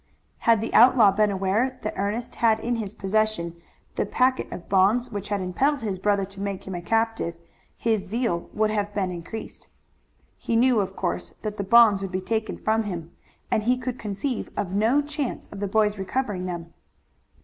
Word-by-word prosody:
Had 225 -2 +5
the 225 - -4
outlaw 235 -4 +7
been 210 +1 +2
aware 200 +7 0
that 215 - -2
Ernest 210 +5 -2
had 220 -2 +4
in 240 +2 -1
his 210 -4 -4
possession 195 -5 -1 0.4
the - - +2
packet 255 +1 +1
of 175 - -8
bonds 210 +6 +3
which 205 -2 -5
had 205 -2 -1
impelled 265 +10 0
his 200 -4 -3
brother 200 0 +1
to 195 +1 -10
make 200 -1 -4
him 190 - -6
a 175 - -4
captive 225 -2 0 0.4
his 220 -4 0
zeal 220 -5 -1
would 215 0 +1
have 205 -1 -2
been 190 -3 0
increased. 180 +6 -8 0.7
He 230 - -1
knew, 245 0 +4
of 195 -1 -2
course, 180 - -3
that 210 -1 -4
the 200 - -2
bonds 210 -1 +6
would 195 -1 -4
be 185 - -1
taken 220 +3 -2
from 220 +1 +1
him 170 -4 -5 0.4
and - - +2
he 245 +4 +2
could 255 -1 -4
conceive 215 +5 -3
of 190 -3 -2
no 225 +9 +3
chance 295 -3 -4
of 200 - -8
the 205 - -1
boy's 210 0 +1
recovering 190 -2 -2
them. 170 -1 -6
210 Hz, 190 wpm, -25 LUFS, 190-230 Hz, 0.7 s, outlaw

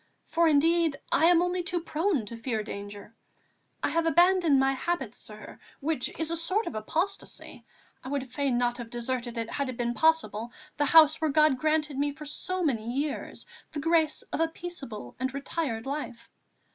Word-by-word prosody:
For 335 +1 +2
indeed, 320 +1 +3 0.2
I 320 - +4
am 345 0 +5
only 360 0 0
too 355 0 0
prone 325 - 0
to 230 - -7
fear 230 -2 -2
danger. 205 0 -8 0.7
I - - +2
have 330 0 +1
abandoned 345 -3 +4
my 270 0 +3
habit, 265 -4 -2
sir, 215 -3 -11 0.2
which 295 -3 -1
is 325 0 0
a - - 0
sort 370 +7 0
of - - -4
apostasy; 330 - -4 0.4
I 260 - -7
would 275 -2 -2
fain 260 -1 0
not 245 0 0
have 235 -1 -6
deserted, 240 0 -3
had 245 +4 -2
it 250 - -6
been 240 0 -1
possible, 240 -8 +1 0.3
the 295 - +2
House 315 +1 +6
where 315 - +2
God 305 -2 +4
granted 305 -1 0
me 290 0 +1
for 300 +1 -10
so 370 +5 -2
many 235 -7 0
years 280 +3 -3 0.3
the 300 - -3
grace 320 0 +2
of - - -1
a 325 - +3
peaceable 285 - -7
and 260 +1 -1
retired 275 -5 -3
life. 270 -4 -5
290 Hz, 180 wpm, -28 LUFS, 240-330 Hz, 0.7 s, House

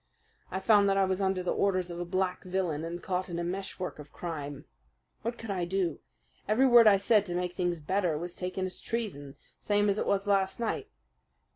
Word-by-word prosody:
I 190 - -3
found 205 0 +5
that 195 - +2
I 195 - +4
was 190 +1 -1
under 190 -1 +1
the 180 - 0
orders 185 -3 +1
of 170 - -6
a 175 - -2
black 185 +1 -1
villain 180 -5 -1
and 170 +1 -5
caught 185 0 -2
in 170 - -4
a 170 - -1
meshwork 185 -1 -4
of 150 0 -11
crime. 145 -4 -6 0.6
What 235 +2 -3
could 225 -2 -6
I 185 -3 -1
do? 175 -2 -1 0.5
Every 220 +6 +4
word 240 -3 +8
I 200 -2 +7
said 205 +1 +3
to 175 - -3
make 180 0 -1
things 175 -2 -1
better 175 0 0
was 175 +2 -6
taken 185 +1 -3
as 185 - -6
treason, 180 -12 -4 0.3
same 205 0 +2
as 200 +1 +1
it - - -1
was 200 0 +1
last 195 +1 +1
night. 235 - -2
185 Hz, 215 wpm, -30 LUFS, 175-200 Hz, 0.6 s, word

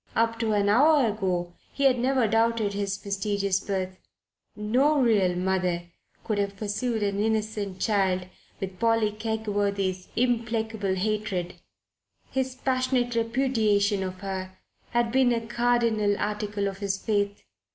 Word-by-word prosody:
Up 230 0 +1
to 225 -2 +1
an 205 -1 +2
hour 280 +6 +5
ago 180 -4 -2 0.2
he 280 - -3
had 260 -3 +4
never 255 -1 +2
doubted 225 -1 +1
his 200 0 -3
mysterious 200 -1 0
birth. 190 -2 -3 0.6
No 255 +8 +2
real 205 -8 +3
mother 180 -2 -1 0.3
could 215 -2 -1
have 200 0 -2
pursued 215 +2 -2
an 200 0 -1
innocent 215 -3 -1
child 190 -4 +1 0.3
with 190 -1 -6
Polly 225 -2 +2
Kegworthy's 205 -4 -2
implacable 225 -4 0
hatred. 195 -3 -2 0.7
His 260 -1 -1
passionate 255 -2 0
repudiation 225 -4 +1
of 185 0 -5
her 190 -1 -5 0.3
had 235 -1 +1
been 260 0 +4
a 230 -1 -1
cardinal 235 -3 +1
article 210 -1 -2
of 195 -1 -5
his 200 -1 -1
faith. 205 -1 -1
210 Hz, 130 wpm, -26 LUFS, 195-230 Hz, 0.7 s, hour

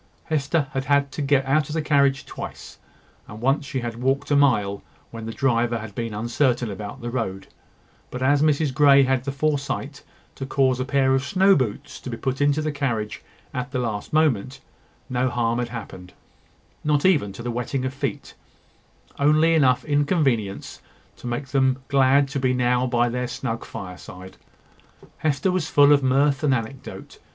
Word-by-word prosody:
Hester 155 0 0
had 135 0 -3
had 140 0 +2
to 150 - -5
get 135 -1 +2
out 140 +2 +1
of 150 - -4
the 160 - 0
carriage 140 -3 +2
twice; - - -9 0.5
and 105 - -10
once 135 +4 0
she 130 - -3
had 120 0 -5
walked 135 +3 0
a - - +4
mile, 105 -8 +2 0.3
when 115 -1 -7
the - - -4
driver 120 -1 +1
had 110 -2 -8
been 115 +2 -4
uncertain 120 +2 0
about 105 +5 -7
the 120 0 -4
road; 105 -6 -3 0.6
but 125 0 -5
as 140 +2 +3
Mrs 150 -2 +2
Grey 140 0 +6
had 130 0 +2
had - - -18
the 140 - -2
foresight 140 0 -2 0.3
to 135 - -7
cause 130 -2 +1
a 130 - -1
pair 135 -1 +2
of 135 0 +1
snow 190 +7 +4
boots 120 -7 -3
to - - -8
be 115 - -5
put 130 +3 -3
into 145 +1 +2
the 155 - -1
carriage 120 -7 -3 0.3
at 125 0 -3
the 130 - -3
last 110 -4 -3
moment, 135 -4 +1 0.5
no 125 0 0
harm 120 -1 0
had 120 -1 -2
happened, 100 -6 -9 0.7
not 150 0 +1
even 150 - +3
to 115 - -9
the 120 - -3
wetting 125 +2 -3
of 130 - -3
feet; 135 -5 -4 0.9
only 155 +3 +4
enough 130 -6 +3
inconvenience 145 - 0 0.3
to - - -9
make 120 +3 -4
them 130 -1 +1
glad 140 0 +4
to 140 0 -3
be 130 -1 +1
now 125 0 +1
by 120 -1 +2
their 125 +1 -2
snug 115 -2 -4
fireside. 95 0 -9 0.8
Hester 155 +5 0
was 180 -3 -1
full 145 0 +6
of 140 - +3
mirth 135 +2 +2
and 140 -3 +3
anecdote. 120 +3 -7
130 Hz, 180 wpm, -23 LUFS, 120-140 Hz, 0.9 s, Grey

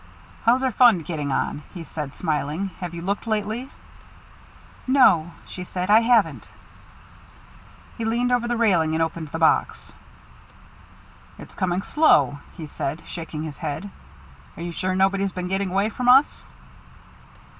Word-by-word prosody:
"How's 245 +3 +4
our 260 - +1
fund 220 -9 +4
getting 150 -5 -3
on?" 145 - -1
he 170 - -6
said, 150 -4 -7
smiling. 155 +3 -2
"Have 175 -2 -6
you 170 - -6
looked 200 +4 -3
lately?" 220 +4 -2 1.2
"No," 250 - +4 0.2
she 180 - -8
said, 180 +2 -3
"I 215 - +8
haven't." 230 -2 +2 1.5
He - - -2
leaned 240 +2 0
over 245 -1 +1
the 240 0 -1
railing 170 -9 +2
and 165 - +2
opened 165 0 -4
the 155 - -5
box. 160 -1 +1 1.4
"It's - - -12
coming 185 0 -1
slow," 145 - +3 0.2
he 160 - -6
said, 150 +2 -5
shaking 160 -2 -6
his 155 -3 -7
head. 165 +6 -5 0.7
"Are 170 - -6
you 175 - -4
sure 185 +2 -2
nobody's 195 0 +1
been 180 0 -4
getting 195 0 -1
away 195 +3 +1
from 250 +2 -1
us?" 265 +3 +4
185 Hz, 145 wpm, -23 LUFS, 160-225 Hz, 1.5 s, I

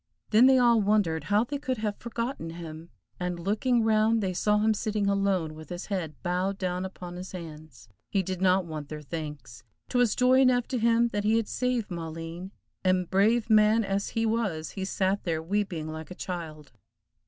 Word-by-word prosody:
Then 230 +4 +7
they 265 0 +6
all 235 -3 +5
wondered 200 -6 +1
how 210 +2 +3
they 280 +4 -4
could 260 -2 -2
have 210 -1 -2
forgotten 235 -6 -4
him, 165 0 -8 0.3
and 180 -1 -3
looking 220 +6 +1
round 220 0 +3
they 185 -1 -1
saw 210 +3 +2
him 215 +1 +3
sitting 210 -1 -1
alone, 195 -5 +1
with 155 -1 -11
his 175 +1 -5
head 165 -6 -3
bowed 185 +2 -1
down 185 -1 -2
upon 180 -2 -8
his 185 +1 -8
hands. 155 -7 -10 0.2
He 195 -2 +1
did 185 0 -4
not 185 0 +3
want 155 -3 -6
their 150 -1 -7
thanks. 150 -5 -7 0.3
'Twas 245 -3 +2
joy 255 +1 +4
enough 250 -2 +4
to 255 - -1
him, 235 +1 +3
that 205 -2 -2
he 220 +2 +3
had 225 -2 0
saved 250 -4 -1
Maleen, 165 +2 -6 0.3
and, 185 -2 +1
brave 215 +5 +3
man 215 0 +5
as 195 0 -1
he 225 - +2
was, 205 -9 -1
he 190 -2 -4
sat 195 +1 0
there 165 -4 -1
weeping 175 -2 -2
like 160 0 -7
a 180 - -8
child. 160 -6 -6
195 Hz, 190 wpm, -28 LUFS, 170-220 Hz, 0.3 s, Then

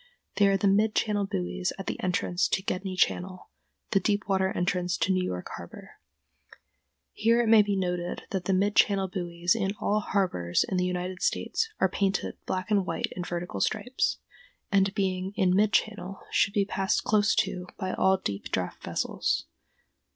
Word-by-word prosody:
They 205 - +5
are 195 0 +3
the 200 - +1
mid 210 +2 +3
channel 205 -2 +1
buoys 90 - -2
at 195 - -6
the - - -4
entrance 180 0 0
to 190 - -1
Gedney 185 -1 -3
Channel, 185 0 -1 0.4
the 195 - +4
deep 205 0 0
water 190 -1 +1
entrance 180 0 0
to 190 - +1
New 185 0 +1
York 90 - -4
harbor. - - -12 1.1
Here 230 +2 +3
it 240 - +2
may 220 -1 +8
be 205 -1 0
noted 180 -2 -2
that 190 -1 -1
mid 200 +2 +2
channel 195 -2 +4
buoys 175 -2 -1
in 200 -3 -1
all 210 +1 +1
harbors 180 - 0
in 185 - -1
the 180 - +1
United 180 0 -3
States 450 -1 0
are - - +4
painted 195 +1 -1
black 185 +3 -3
and 200 -2 +4
white - - -2
in 180 - -3
vertical 175 0 -4
stripes, 230 +5 0 0.5
and, 195 0 +3
being 190 -1 -1
in 185 -2 +3
mid 210 +1 +3
channel, 210 -3 -1
should 200 - +2
be 200 -1 +3
passed 195 -1 0
close 215 0 +3
to 185 -4 -1
by 185 -2 -3
all 190 0 +3
deep 100 - -4
draft 90 -1 -3
vessels. - - -1
190 Hz, 175 wpm, -28 LUFS, 180-205 Hz, 1.1 s, may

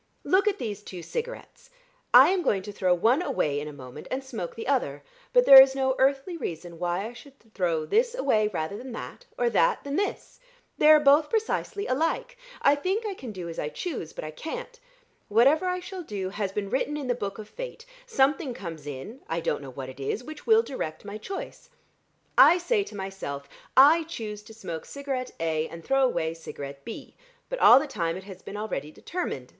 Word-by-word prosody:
Look 385 +3 +3
at 410 -1 +2
these 210 - -4
two 180 -4 -9
cigarettes! 475 - -6 0.4
I - - +9
am 375 -1 +1
going 195 - +1
to 205 - -7
throw 185 -2 0
one 225 - +3
away 145 - 0
in 150 - -5
a - - -6
moment, 135 0 -10
and 265 +1 -3
smoke 225 -10 -6
the 230 - -6
other, 145 - 0 0.3
but - - +5
there 270 -1 +12
is 265 0 +4
no 265 -1 +1
earthly 275 +6 +2
reason 170 - -6
why 175 +3 -1
I 235 - -9
should 275 +3 -14 0.2
throw 165 -4 0
this 475 - +2
away 220 - +2
rather 175 -2 -3
than 255 0 -8
that, - - -8
or 485 - +1
that - - +2
than 280 +1 -3
this: 405 +1 -3 0.4
they 300 - +6
are 310 0 +9
both 295 +1 +5
precisely 430 -2 -1
alike. 330 - -1 0.3
I 280 - +6
think 375 +10 -1
I 415 - -2
can 260 -11 -8
do 180 -4 -7
as 165 - -6
I 150 - -2
choose, 255 - -5
but - - -7
I 155 - -5
can't. 325 - -7 0.5
Whatever 275 - +4
I 365 0 0
shall 370 +1 -7
do, 200 - -4
has 200 0 -3
been 200 0 -4
written 295 +3 0
in 290 - -4
the 250 - +1
Book 200 -4 -5
of 215 -1 -8
Fate; - - -8 0.2
something 275 - +1
comes 165 -7 -8
in 145 - -7
I 165 +1 -1
don't 165 - -1
know 140 - -8
what 130 +1 -7
it 130 +1 -10
is 140 - -2
which 310 +3 -10
will 450 0 +6
direct 160 - -5
my 205 +1 -6
choice. 395 - -7 0.7
I 350 - +9
say 405 +4 +1
to - - -11
myself, 190 -8 -6 0.3
'I 310 +5 +7
choose 215 -9 -6
to 220 - -12
smoke 170 -7 -6
cigarette 270 -3 -4
A 160 -1 0
and 165 0 -11
throw 270 0 +3
away 170 -11 +1
cigarette 140 -4 -8
B,' 230 - -8 0.4
but - - -3
all 250 - +9
the 290 - -3
time 170 - -2
it 190 - -9
has 190 -2 -11
been 205 - -8
already 210 -9 -4
determined. 155 - -5
235 Hz, 210 wpm, -27 LUFS, -, 0.7 s, there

